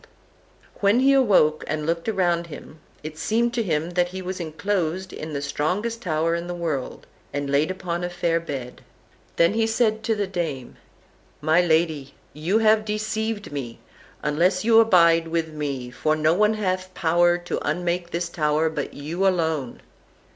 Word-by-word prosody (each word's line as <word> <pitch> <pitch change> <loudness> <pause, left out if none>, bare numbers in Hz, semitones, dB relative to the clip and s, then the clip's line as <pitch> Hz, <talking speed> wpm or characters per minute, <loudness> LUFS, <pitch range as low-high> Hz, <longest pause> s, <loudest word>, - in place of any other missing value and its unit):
And - - -23
when 205 +4 +4
he 275 +1 +5
awoke, 195 - +4
and 155 -1 -2
looked 165 +3 -2
round 175 -5 +1
him, 155 0 -11 0.2
it 155 0 -7
seemed 235 +2 +1
to 235 - 0
him 165 -4 -1
that 175 0 +1
he 185 +1 -7
was 185 0 -5
enclosed 180 +2 -2
in 155 0 -6
the 140 0 -3
strongest 200 +12 -2
tower 165 -3 0
in 170 +1 -3
the 175 - -4
world, 155 -7 -4 0.3
and 145 -1 -3
laid 145 +4 +2
upon 180 -2 -3
a 175 - -2
fair 170 -1 0
bed. 135 -7 -7 0.5
Then 170 +3 +4
said 225 -1 +2
he 220 - -12
to 225 0 -1
the 205 -1 -1
dame: 165 -9 -4 0.6
"My 155 +3 +3
lady, 160 -5 0 0.2
you 165 +8 0
have 220 -1 +4
deceived 215 -1 -3
me, 130 -5 -5 0.5
unless 180 +6 +1
you 225 -1 +6
abide 170 -6 +5
with 165 -1 -1
me, 140 -5 -4
for 155 +5 0
no 155 +1 +2
one 210 +4 +3
hath 185 -2 -2
power 175 +1 +3
to 175 0 -4
unmake 175 0 -1
this 170 0 -2
tower 155 -1 0
but 150 -3 -4
you 165 +7 -1
alone." 160 -8 -1
170 Hz, 170 wpm, -24 LUFS, 155-190 Hz, 0.6 s, you